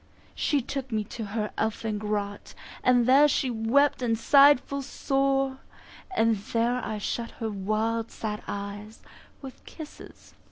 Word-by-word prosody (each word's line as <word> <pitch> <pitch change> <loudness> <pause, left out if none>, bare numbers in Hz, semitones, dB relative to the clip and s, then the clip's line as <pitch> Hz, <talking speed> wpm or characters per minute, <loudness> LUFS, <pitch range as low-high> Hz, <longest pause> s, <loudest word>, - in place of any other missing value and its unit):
She 285 -4 0
took 270 0 -5
me 215 -1 0
to 225 +1 -7
her 210 +1 -3
elfin 220 -1 -1
grot, 205 -1 -4 0.3
And 245 -1 +4
there 275 +4 +6
she 265 -2 0
wept 240 +6 +2
and 230 -2 +1
sighed 280 +3 +6
full 280 +1 -5
sore, 270 0 0 0.6
And 225 -1 +3
there 235 +4 -1
I 215 - -3
shut 230 +3 -3
her 225 -1 -4
wild 215 +3 -1
sad 210 -1 -5
eyes 205 +2 -7 0.4
With 265 -1 -10
kisses 315 -2 -12
four. - - -30
230 Hz, 150 wpm, -27 LUFS, 215-270 Hz, 0.6 s, there